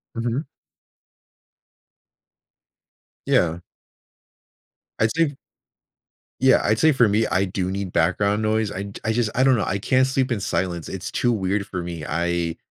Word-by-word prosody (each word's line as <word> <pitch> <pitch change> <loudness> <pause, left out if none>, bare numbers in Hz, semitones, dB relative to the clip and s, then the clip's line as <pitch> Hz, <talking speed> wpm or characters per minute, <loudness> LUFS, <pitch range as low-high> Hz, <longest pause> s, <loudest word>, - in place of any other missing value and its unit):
Mhm. 120 +4 -1 2.8
Yeah. 85 0 +2 1.4
I'd 110 - +3
say 160 -4 +1 1.1
Yeah, 130 - +6
I'd 110 +2 +1
say 160 - +5
for 125 -5 +4
me, 105 +2 +2
I 95 +1 +1
do 95 0 -3
need 95 -1 -4
background 100 +1 +1
noise, 110 -1 0
I'd 100 +1 -6
I 110 - +1
just 115 -1 +1
I 130 - +3
don't 135 -1 +5
know, 110 - 0
I 100 - -1
can't 130 +6 +2
sleep 130 -1 0
in 115 - 0
silence, 90 -4 -2
it's 95 -2 -6
too 120 - +1
weird 100 -2 -1
for 90 -3 -4
me, 85 -2 -6
I 85 +1 -1
100 Hz, 145 wpm, -23 LUFS, 90-120 Hz, 2.8 s, Yeah